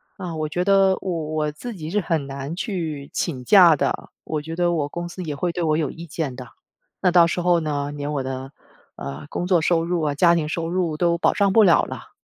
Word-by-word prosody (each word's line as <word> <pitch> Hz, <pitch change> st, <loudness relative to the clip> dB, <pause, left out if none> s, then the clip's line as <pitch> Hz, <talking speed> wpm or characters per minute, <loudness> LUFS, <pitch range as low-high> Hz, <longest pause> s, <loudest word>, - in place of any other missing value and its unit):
啊， 180 Hz, -4 st, -6 dB
我 155 Hz, -1 st, -2 dB
觉 175 Hz, +4 st, -1 dB
得 195 Hz, 0 st, +4 dB
我 170 Hz, -4 st, -2 dB
我 150 Hz, -1 st, 0 dB
自 235 Hz, +11 st, -7 dB
己 160 Hz, -4 st, -6 dB
是 205 Hz, +5 st, +1 dB
很 165 Hz, -6 st, -1 dB
难 140 Hz, +3 st, -6 dB
去 165 Hz, -, -4 dB
请 135 Hz, -8 st, -3 dB
假 175 Hz, +1 st, +7 dB
的， -, -, -2 dB
我 155 Hz, -1 st, -3 dB
觉 160 Hz, +2 st, -6 dB
得 175 Hz, 0 st, +1 dB
我 155 Hz, -4 st, 0 dB
公 175 Hz, +3 st, -5 dB
司 185 Hz, -, -8 dB
也 150 Hz, -4 st, -4 dB
会 175 Hz, +5 st, -1 dB
对 175 Hz, -, -4 dB
我 155 Hz, -2 st, +2 dB
有 155 Hz, -2 st, -1 dB
意 170 Hz, +1 st, -10 dB
见 150 Hz, -3 st, -3 dB
的。 125 Hz, 0 st, -9 dB, 0.5 s
那 180 Hz, -, +3 dB
到 170 Hz, -1 st, +6 dB
时 175 Hz, -, -2 dB
候 175 Hz, -1 st, +3 dB
呢， 145 Hz, -2 st, -2 dB
连 145 Hz, 0 st, -4 dB
我 140 Hz, -2 st, -1 dB
的， 130 Hz, +1 st, -6 dB, 0.4 s
呃， 70 Hz, +2 st, -7 dB
工 175 Hz, -, -3 dB
作 180 Hz, -2 st, +3 dB
收 165 Hz, +1 st, +2 dB
入 170 Hz, 0 st, -1 dB
啊、 145 Hz, -2 st, 0 dB
家 170 Hz, +3 st, +5 dB
庭 160 Hz, -3 st, -1 dB
收 165 Hz, +1 st, -3 dB
入 175 Hz, -3 st, -1 dB
都 170 Hz, +1 st, +1 dB
保 -, -, +2 dB
障 200 Hz, -2 st, +2 dB
不 220 Hz, +3 st, +6 dB
了 180 Hz, -4 st, +5 dB
了。 -, -, -8 dB
165 Hz, 260 characters per minute, -22 LUFS, 150-175 Hz, 0.5 s, 假